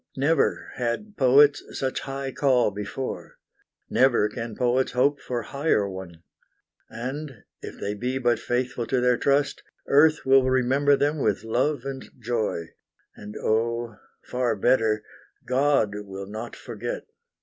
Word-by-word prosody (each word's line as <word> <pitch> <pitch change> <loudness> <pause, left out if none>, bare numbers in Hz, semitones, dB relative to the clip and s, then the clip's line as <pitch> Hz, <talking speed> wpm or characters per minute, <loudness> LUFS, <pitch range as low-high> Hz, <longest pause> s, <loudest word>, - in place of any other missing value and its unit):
Never 150 +5 +1
had 130 - -3
poets 145 +1 +5 0.2
such 130 -1 -1
high 135 0 -5
call 130 -5 +2
before, 105 +6 -6 0.5
Never 125 -5 +3
can 115 0 -6
poets 125 +1 +1
hope 135 +3 +2
for 120 -2 -3
higher 140 -6 0
one, 95 -3 -9 0.7
And, 130 +1 -6 0.2
if - - -9
they 100 - -2
be 125 +5 -2
but 120 -3 +1
faithful 125 -1 -2
to 130 - +1
their 125 0 +3
trust, 140 0 +1 0.2
Earth 155 +2 +4
will 135 -1 +5
remember 135 +3 +3
them 145 +2 0
with 105 -5 0
love 125 +4 0
and 135 -1 -6
joy, 110 -8 -2 0.5
And 105 0 -9
O, 115 0 -1 0.3
far 125 -2 0
better, 110 -1 +2 0.4
God 130 -4 +2
will 100 -1 -7
not 110 +4 -7
forget. 120 +2 -6
125 Hz, 135 wpm, -25 LUFS, 110-135 Hz, 0.7 s, poets